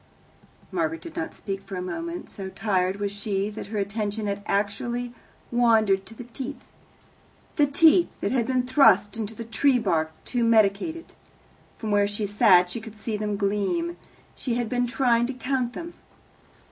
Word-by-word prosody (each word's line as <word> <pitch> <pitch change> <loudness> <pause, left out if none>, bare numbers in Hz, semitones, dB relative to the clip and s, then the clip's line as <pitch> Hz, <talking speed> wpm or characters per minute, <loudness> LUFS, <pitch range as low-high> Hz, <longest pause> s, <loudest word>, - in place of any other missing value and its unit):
Margaret 330 -1 -1
did 335 - -10
not 325 -1 -4
speak 195 -1 -5
for 195 - -8
a - - -3
moment. 335 - -5
So 195 -1 -7
tired 190 -2 0
was 200 -1 -1
she 200 0 -2
that 210 - -7
her 215 +1 -4
attention 205 +1 -2
had 200 0 -2
actually 240 +4 -1 0.4
wandered 220 -5 +3
to 225 - -12
the 245 - -8
teeth 260 +4 -6 1.0
the 295 -2 +4
teeth 320 +4 +5
that - - -1
had 245 -3 +1
been 255 -1 +1
thrust 210 -6 +5
into 220 -1 -4
the 230 - -6
tree's 245 +2 +2
bark 160 -5 +1
to 245 -2 0
medicate 220 +5 +3
it. 335 - -12 0.6
From 220 -2 -4
where 205 0 +3
she 205 +1 -2
sat 185 -3 +5
she 230 - -4
could 220 -1 -11
see 215 +1 -3
them 210 -1 -2
gleam. 210 - 0 0.4
She 245 -3 -3
had 240 -2 -1
been 245 0 0
trying 240 -1 +2
to 270 - -4
count 255 -1 -1
them. 340 +4 -7
225 Hz, 175 wpm, -25 LUFS, 200-255 Hz, 1.0 s, teeth